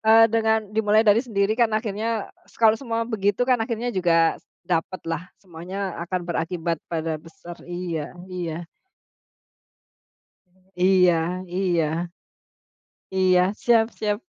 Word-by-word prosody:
eee, 225 +1 +8
dengan 220 -1 +3 0.2
dimulai 215 0 +4
dari 210 +3 +6
sendiri 200 -2 +1
kan 230 -2 +4
akhirnya 220 0 -3 0.2
s - - -22
kalau 220 -1 +6
semua 230 -4 -2
begitu 205 +2 +1
kan 250 - +4
akhirnya 230 +1 -2
juga 165 -3 +3
s - - -38 0.2
dapatlah. 170 0 -2 0.2
Semuanya 185 +2 -6
akan 185 +1 -2
berakibat 165 -1 -2
pada 165 -1 -2
besar 170 +1 -11
iya, 175 -4 -4 0.2
iya. 170 -2 -4 2.2
Iya 185 -1 +5 0.4
iya. 170 -2 0 1.0
Iya. 185 -1 +4 0.2
Siap 230 -2 +5
siap. 210 -1 0
185 Hz, 115 wpm, -24 LUFS, 170-220 Hz, 2.2 s, eee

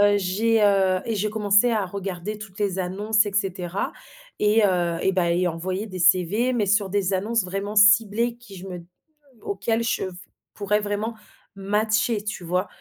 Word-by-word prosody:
Heu, 205 0 +5
j'ai, 210 +4 +1
heu 190 -2 +3
et 230 - -2
j'ai 210 +2 0
commencé 210 +2 +3
à 215 -3 0
regarder 195 +1 -5
toutes 205 -2 -11
les 195 -2 -1
annonces 205 +4 +1
et 205 - -4
cetera 190 -2 -2 0.5
et 210 +1 +3
heu 175 -3 +1
et 190 - +3
bah 175 -2 +1
et 180 +1 +1
envoyer 185 +5 -4
des 185 -3 -8
CV, 185 +7 +3
mais 235 -4 +1
sur 205 0 +2
des 200 -1 0
annonces 210 +3 0
vraiment 195 +3 -4
ciblées 215 +3 +4
qui 235 -5 -13
je 185 +1 -9
me 180 -1 -6 0.7
auxquelles 225 +4 -1
je 230 - -1
v 185 - -5 0.4
pourrais 210 0 0
vraiment 210 +2 -3 0.4
matcher, 210 +2 0
tu 210 -4 -5
vois? 180 +3 -1
200 Hz, 180 wpm, -24 LUFS, 185-215 Hz, 0.7 s, Heu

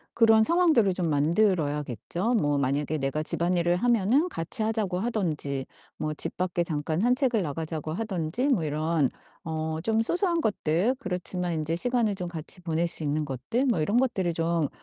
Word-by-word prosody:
그런 225 -1 +5
상황들을 315 - +3
좀 180 -2 -1
만들어야겠죠. 155 - 0
뭐 145 -10 +1
만약에 140 +3 0
내가 135 +2 -2
집안일을 175 +1 +1
하면은 240 - +2
같이 170 - -2
하자고 215 -5 -1
하든지 155 - -2 0.3
뭐 155 0 -2
집 - - -1
밖에 180 -1 -1
잠깐 155 0 -2
산책을 245 0 +2
나가자고 155 0 -4
하든지 195 - -2
뭐 215 -12 +2
이런 155 -1 0 0.4
어 160 0 -3
좀 225 0 +2
소소한 345 - +1
것들 200 - +1
그렇지만 180 -4 -2
인제 155 +1 -1
시간을 235 -1 +1
좀 180 -2 -4
같이 165 +1 -4
보낼 165 0 0
수 165 - +2
있는 150 +1 0
것들 145 - -2
뭐 240 -9 +1
이런 205 +9 +1
것들을 195 -9 +1
좀 165 -1 0
175 Hz, 350 characters per minute, -27 LUFS, 155-225 Hz, 0.4 s, 그런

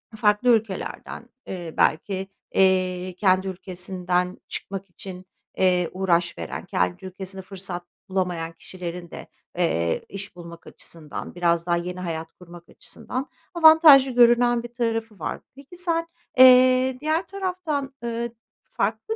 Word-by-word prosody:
farklı 210 +3 +2
ülkelerden, 225 +1 -1 0.2
eee, 175 -3 -6
belki, 190 +4 +1 0.3
eee, 185 -1 +2
kendi 190 -1 +3
ülkesinden 180 -1 -2
çıkmak 195 0 -6
için, 185 +1 -10 0.3
eee, 180 -2 +2
uğraş 175 -2 +1
veren, 85 -2 -6
kendi 90 - -1
ülkesinde 190 +1 -7
fırsat 185 -2 -7 0.3
bulamayan 180 -3 -2
kişilerin 175 0 -8
de, - - -9 0.3
eee, 85 +1 0
iş 195 -1 -8
bulmak 170 -1 -11
açısından, 155 -1 -9
biraz 170 -1 +1
daha 175 -1 +1
yeni 180 +1 -5
hayat 165 -2 -5
kurmak 175 -1 -14
açısından 260 +3 -6 0.2
avantajlı 315 -5 +8
görünen 240 0 +4
bir 240 0 -9
tarafı 225 -3 -2
var. - - -4
Peki 280 +6 -14
sen, 335 -2 -1 0.3
eee, 255 0 +7
diğer 315 +4 0
taraftan, 360 -8 -3
eee, 235 0 -3 0.4
farklı 220 - -1
190 Hz, 125 wpm, -24 LUFS, 180-245 Hz, 0.4 s, avantajlı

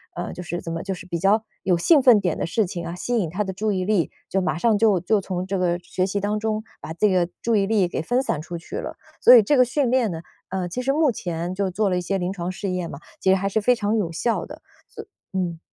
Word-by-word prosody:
呃， 175 - -4
就 180 - -7
是 175 0 -4
怎 165 - -6
么 165 - -3
就 195 -1 -3
是 180 - -11
比 170 -2 -3
较 205 +5 +3 0.2
有 180 -2 +2
兴 290 - +5
奋 245 -5 +7
点 180 -4 0
的 - - 0
事 215 +5 +1
情 175 -2 -5
啊， 170 - -5
吸 240 +6 -2
引 175 -6 -1
他 195 +6 -2
的 190 - -4
注 210 +2 -1
意 185 -1 -1
力， 200 -4 +1 0.2
就 195 - +1
马 180 -3 -1
上 225 +5 +3
就 205 -4 +3
就 210 +4 +2
从 185 -1 -3
这 190 -1 -2
个 175 -1 +1
学 185 +1 -2
习 200 +1 -1
当 210 +1 -1
中， 220 0 -2 0.2
把 - - -7
这 210 +4 +2
个 180 -2 +2
注 230 -1 +2
意 195 -1 +2
力 205 -5 +2
给 170 - -3
分 245 +10 0
散 155 - -2
出 170 +2 -6
去 165 - -7
了。 - - -5 0.3
所 250 - +9
以 225 - +8
这 285 +7 +2
个 255 - +7
训 255 0 0
练 250 -4 +2
呢， 165 -1 -5 0.3
呃， 185 -1 -2
其 250 +9 -3
实 270 - +1
目 305 -3 +3
前 175 -3 -4
就 195 0 -1
做 200 +3 0
了 180 - 0
一 - - -1
些 195 +2 -1
临 180 0 -2
床 175 -1 -4
试 190 +2 -4
验 180 -2 -3
嘛， 140 - -8 0.2
其 190 - +1
实 190 - +6
还 195 +1 -1
是 215 +2 0
非 250 +4 +4
常 210 -1 -1
有 175 -6 -1
效 225 +8 -1
的。 - - -11 0.3
所 - - -10
以 - - -26 0.3
嗯。 170 -3 -2
190 Hz, 315 characters per minute, -23 LUFS, 175-215 Hz, 0.3 s, 所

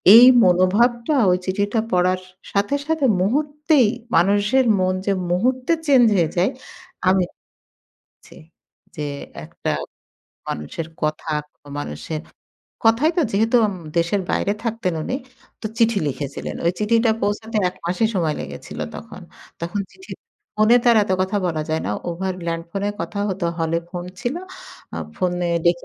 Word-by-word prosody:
এই 240 +2 +11 0.2
মনোভাবটা 230 - +3 0.2
ওই 180 - +3
চিঠিটা 205 +4 0
পড়ার 185 0 +2
স - - -19 0.2
সাথে, 205 +7 +1
সাথে 320 -3 +1 0.2
মুহূর্তেই, 290 - +2 0.3
মানুষের 205 +8 +3
মন 185 0 +2
যে 200 - +3 0.2
মুহূর্তে 255 - +1
চেঞ্জ 265 -4 +6
হয়ে 165 -3 +2
যায়, 180 +3 +3 0.6
আমি 190 0 +4 1.0
জি। - - -15 0.6
যে 150 - -3 0.4
একটা - - -4 0.8
মানুষের 75 - -4 0.2
কথা, 155 +1 -2 0.5
মানুষের 145 - -5 0.6
কথাই 230 +8 +4
তো - - +5
যেহেতু 225 +4 +3
উম 205 - -3 0.2
দেশের 170 +4 +1
বাইরে 200 - +1
থাকতেন 225 -6 -1
উনি, 255 - -2 0.4
তো - - -3
চিঠি 230 -2 +3
লিখেছিলেন। 140 0 -5
ওই 170 - +3
চিঠিটা 225 +2 +3
পৌঁছাতে 215 +2 -1
১ 180 - -8
মাসই 180 +6 +1
সময় 165 -5 +1
লেগেছিল 70 +1 -8 0.2
তখন। - - -10 0.4
তখন 170 +5 -2
চিঠি, 380 - -15 0.5
ফোনে 215 +3 +6
তো - - -5
আর - - +4
এত 190 - -1
কথা 190 +2 -1
বলা 160 -3 -1
যায় 160 0 -1
না। - - -1 0.2
ওভার 185 +2 -3
ল্যান্ডফোনে 170 +4 -2
কথা 205 - -4
হত, 190 -1 -4 0.2
হলে 165 0 +1
ফোন 175 -1 -5 0.2
ছিল। 245 +3 -1 0.6
আ - - -4 0.2
ফোনে 180 -1 0 0.2
দেখে 170 0 +2
195 Hz, 145 wpm, -21 LUFS, 175-230 Hz, 1.0 s, এই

